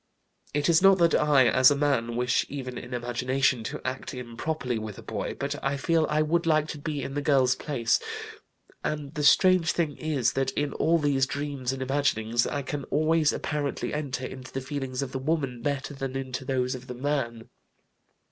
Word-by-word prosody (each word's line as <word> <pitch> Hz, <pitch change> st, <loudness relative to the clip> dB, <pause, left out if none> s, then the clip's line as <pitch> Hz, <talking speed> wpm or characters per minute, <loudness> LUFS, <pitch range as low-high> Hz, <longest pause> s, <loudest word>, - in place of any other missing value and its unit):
It 145 Hz, 0 st, +1 dB
is 170 Hz, -1 st, +5 dB
not 195 Hz, 0 st, +7 dB
that 170 Hz, -2 st, +3 dB
I, 145 Hz, -4 st, +5 dB
as 130 Hz, +1 st, +6 dB
a 145 Hz, -, +2 dB
man, 135 Hz, -5 st, 0 dB
wish 125 Hz, +1 st, +2 dB
even 130 Hz, -3 st, -5 dB
in 125 Hz, -, -8 dB
imagination 125 Hz, +1 st, 0 dB
to -, -, -6 dB
act 130 Hz, +1 st, -4 dB
improperly 125 Hz, +1 st, -3 dB
with 110 Hz, -2 st, -7 dB
a -, -, -10 dB
boy, -, -, -4 dB
but 145 Hz, +2 st, -3 dB
I 135 Hz, +1 st, 0 dB
feel 160 Hz, +3 st, +2 dB
I 155 Hz, 0 st, +2 dB
would 170 Hz, +2 st, 0 dB
like 155 Hz, -1 st, +3 dB
to 150 Hz, -, -5 dB
be 145 Hz, -1 st, -3 dB
in 135 Hz, -, -5 dB
the 145 Hz, -, -1 dB
girl's 135 Hz, -3 st, +3 dB
place, 120 Hz, -5 st, 0 dB, 0.8 s
and 150 Hz, -1 st, -3 dB
the 150 Hz, -, -3 dB
strange 185 Hz, +1 st, +5 dB
thing 160 Hz, -5 st, -1 dB
is 140 Hz, -5 st, 0 dB
that 135 Hz, 0 st, 0 dB
in 145 Hz, -1 st, -1 dB
all 165 Hz, +2 st, +2 dB
these 140 Hz, -4 st, +2 dB
dreams 140 Hz, -3 st, -3 dB
and 135 Hz, 0 st, -3 dB
imaginings 120 Hz, -4 st, +1 dB
I 145 Hz, -, -2 dB
can 140 Hz, +1 st, -4 dB
always 155 Hz, 0 st, +2 dB
apparently 145 Hz, -2 st, -3 dB
enter 135 Hz, -4 st, -3 dB
into 130 Hz, -1 st, -8 dB
the 135 Hz, -, -3 dB
feelings 130 Hz, -1 st, -3 dB
of 130 Hz, -, -6 dB
the 130 Hz, -, -3 dB
woman 135 Hz, -4 st, -1 dB
better 140 Hz, +2 st, -2 dB
than 135 Hz, -1 st, -5 dB
into 130 Hz, -1 st, -4 dB
those 130 Hz, -1 st, 0 dB
of 125 Hz, -1 st, -8 dB
the 125 Hz, -, -6 dB
man. 120 Hz, -4 st, -2 dB
135 Hz, 195 wpm, -27 LUFS, 130-150 Hz, 0.8 s, not